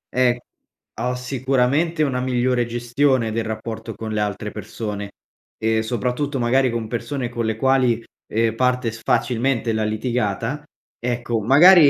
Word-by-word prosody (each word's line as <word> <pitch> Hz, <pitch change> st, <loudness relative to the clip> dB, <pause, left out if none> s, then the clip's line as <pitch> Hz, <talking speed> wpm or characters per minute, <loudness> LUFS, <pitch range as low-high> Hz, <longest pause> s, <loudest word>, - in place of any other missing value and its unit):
Eh, 125 Hz, -1 st, +4 dB, 0.6 s
ho 125 Hz, +2 st, 0 dB
sicuramente 135 Hz, +5 st, +1 dB
una 130 Hz, -4 st, 0 dB
migliore 125 Hz, -1 st, +1 dB
gestione 120 Hz, 0 st, +1 dB
del 115 Hz, 0 st, -1 dB
rapporto 110 Hz, 0 st, -5 dB
con 110 Hz, 0 st, -5 dB
le 105 Hz, -, 0 dB
altre 105 Hz, 0 st, -2 dB
persone, 100 Hz, -2 st, -5 dB, 0.5 s
e 110 Hz, 0 st, +1 dB
soprattutto, 125 Hz, +5 st, -1 dB
magari, 130 Hz, +2 st, +3 dB
con 115 Hz, -2 st, -2 dB
persone 125 Hz, +2 st, -3 dB
con 115 Hz, -1 st, -2 dB
le 110 Hz, -1 st, 0 dB
quali, 125 Hz, -2 st, +2 dB, 0.2 s
ehm, 115 Hz, 0 st, +1 dB
parte 125 Hz, -1 st, +1 dB
s 110 Hz, -, -10 dB
facilmente 125 Hz, -2 st, +1 dB
la 110 Hz, 0 st, 0 dB
litigata 115 Hz, +3 st, -1 dB, 0.4 s
ecco, 120 Hz, -2 st, -1 dB
magari 150 Hz, -, +8 dB
120 Hz, 140 wpm, -22 LUFS, 110-130 Hz, 0.6 s, magari